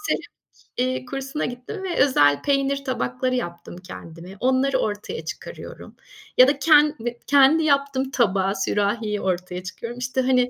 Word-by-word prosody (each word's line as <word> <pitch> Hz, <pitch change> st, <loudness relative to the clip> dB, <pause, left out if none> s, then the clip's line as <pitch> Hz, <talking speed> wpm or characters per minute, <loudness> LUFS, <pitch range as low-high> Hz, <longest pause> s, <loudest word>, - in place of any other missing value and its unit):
seramik, -, -, -11 dB, 0.4 s
eee, 255 Hz, +1 st, -1 dB
kursuna 270 Hz, +3 st, -4 dB
gittim 250 Hz, -, -6 dB
ve 360 Hz, -2 st, -3 dB
özel 145 Hz, -, +4 dB
peynir 275 Hz, 0 st, 0 dB
tabakları 255 Hz, 0 st, -1 dB
yaptım 175 Hz, -6 st, -5 dB
kendime. 180 Hz, 0 st, -11 dB
Onları 260 Hz, +1 st, +2 dB
ortaya 210 Hz, -, -4 dB
çıkarıyorum -, -, -9 dB, 0.4 s
ya 255 Hz, -, +8 dB
da 280 Hz, 0 st, +1 dB
ken 300 Hz, 0 st, +5 dB
eee, 240 Hz, +1 st, -5 dB
kendi 285 Hz, +3 st, +5 dB
yaptığım 280 Hz, -2 st, +1 dB
tabağı, 195 Hz, -5 st, +1 dB
sürahiyi 210 Hz, +2 st, -1 dB
ortaya 180 Hz, -1 st, -3 dB
çıkıyorum. 230 Hz, +6 st, -7 dB
İşte, 255 Hz, +1 st, -1 dB
hani, 250 Hz, -1 st, +2 dB
255 Hz, 145 wpm, -23 LUFS, 205-275 Hz, 0.4 s, ya